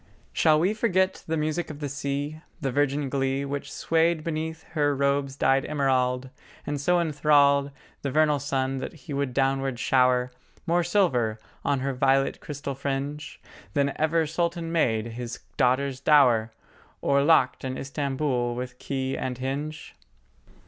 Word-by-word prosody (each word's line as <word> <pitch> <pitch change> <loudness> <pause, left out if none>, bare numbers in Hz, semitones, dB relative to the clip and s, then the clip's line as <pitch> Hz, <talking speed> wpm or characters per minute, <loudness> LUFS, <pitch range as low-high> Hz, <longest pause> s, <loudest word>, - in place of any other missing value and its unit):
Shall 155 -1 +4
we 185 +6 +2
forget 190 -4 +1
the 160 0 0
music 155 +3 -1
of 150 -2 -8
the 145 - -3
sea, 145 +2 -3 0.2
The 135 -2 -2
virgin 145 +1 +1
glee 135 0 -1
Which 140 0 -5
swayed 165 0 +1
beneath 160 0 -3
her 145 -3 +1
robes 140 0 0
dyed 135 -1 +2
emerald, 130 -3 0 0.3
And 145 -1 -3
so 175 +4 +3
enthralled 145 -3 +3 0.3
The 140 - -2
vernal 150 +1 +3
sun 135 -1 -1
that - - -5
he 150 -2 -9
would 140 -2 -1
downward 135 -1 0
shower 125 0 +2 0.3
More 175 0 +2
silver 135 - +1 0.3
on 140 -2 0
her 135 +1 -1
violet 135 +1 +2
crystal 145 -1 -5
fringe 140 +2 -4 0.4
Than 140 -1 +2
ever 160 +1 +2
Sultan 170 +1 -2
made 115 -10 +1
his 120 0 -6
daughter's 130 0 +1
dower 125 -6 +4 0.5
Or 140 0 +3
locked 145 -3 +3
in 130 0 -3
Istamboul 135 -3 -1
with 125 0 -6
key 135 -1 -2
and 125 -1 -3
hinge? 140 +4 -4
140 Hz, 150 wpm, -26 LUFS, 130-155 Hz, 0.5 s, Shall